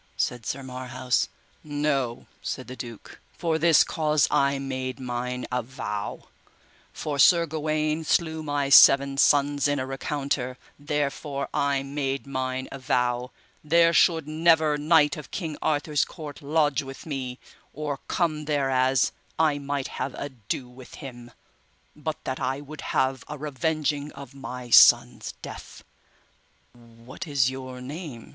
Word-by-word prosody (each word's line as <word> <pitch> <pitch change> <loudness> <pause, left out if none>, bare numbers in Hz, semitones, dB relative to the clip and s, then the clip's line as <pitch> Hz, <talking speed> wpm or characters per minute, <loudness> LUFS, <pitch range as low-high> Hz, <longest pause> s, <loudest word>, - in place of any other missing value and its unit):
said 120 -2 -2
Sir 135 - -3
Marhaus. 130 -1 -1 0.4
No, 145 -5 -1 0.2
said 130 - -4
the 130 - -7
duke, 120 -4 -10 0.2
for 160 -2 0
this 165 -1 +6
cause 155 -2 +1
I 140 0 +3
made 130 -1 -4
mine 125 0 -3
avow, 115 -5 -4 0.6
for 145 -2 -4
Sir 170 +4 +6
Gawaine 155 0 -1
slew 160 0 +1
my 145 -2 -1
seven 140 0 +8
sons 145 0 +4
in 145 0 +1
a 130 - -2
recounter, 135 -1 -2 0.2
therefore 145 -1 -2
I 140 -1 +1
made 135 -1 -3
mine 130 -1 -3
avow, 125 -2 0 0.3
there 170 +2 +4
should 160 -5 +4
never 160 -1 +3
knight 150 0 +3
of 150 - -9
King 160 -6 -4
Arthur's 150 0 +1
court 150 -3 -9
lodge 150 -2 +2
with 135 -1 -10
me, 130 -5 -4 0.3
or 145 -2 -4
come 155 -4 0
thereas 135 -3 +2 0.3
I 155 -3 +2
might 140 -1 -3
have - - -4
ado 130 -2 -5
with 125 0 -13
him, 120 -3 -9 0.7
but 155 +1 -4
that 130 - -3
I 130 +2 -1
would 145 +1 -9
have 130 -1 0
a 150 - -5
revenging 150 +1 -1
of 140 0 -10
my 125 -3 -8
sons' - - +6
death. - - -9 0.9
What 120 +4 -11
is 135 -3 +2
your 130 -1 -7
name? 140 -2 -8
140 Hz, 135 wpm, -26 LUFS, 130-150 Hz, 0.9 s, seven